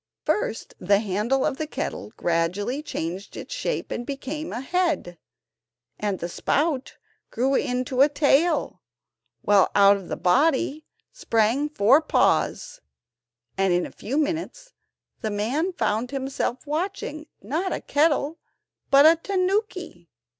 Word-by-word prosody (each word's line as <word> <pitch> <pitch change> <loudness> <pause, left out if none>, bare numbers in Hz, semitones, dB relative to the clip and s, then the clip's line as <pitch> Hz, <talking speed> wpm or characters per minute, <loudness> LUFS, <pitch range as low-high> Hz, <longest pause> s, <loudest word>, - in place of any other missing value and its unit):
First 320 - -2
the 200 +2 +3
handle 215 +6 0
of 265 - -1
the 310 - -3
kettle - - -5
gradually 185 - -1
changed 185 - -5
its - - -7
shape - - -3
and 240 - -3
became 285 +4 -5
a 235 - -4
head, 315 - -1 0.8
and 205 -2 -1
the 170 - -4
spout 280 - -1 0.3
grew 260 +3 0
into 255 0 0
a 285 - +6
tail, 295 +3 +2 0.6
while 205 -2 +4
out 200 0 +6
of 195 - -10
the - - -4
body 285 - +2 0.2
sprang 250 - +1
four 270 +1 +4
paws, - - +1 0.8
and 195 -2 +3
in 175 0 +1
a - - -9
few 265 +6 -4
minutes 335 +12 -2 0.5
the 220 - -2
man 245 - -1
found 240 - -1
himself 265 -1 -3
watching, 310 -1 -3
not 320 - -2
a - - -2
kettle, 300 +1 +1 0.5
but 280 +1 +7
a 320 +1 +8
tanuki! 370 - -2
275 Hz, 130 wpm, -24 LUFS, 210-315 Hz, 0.8 s, a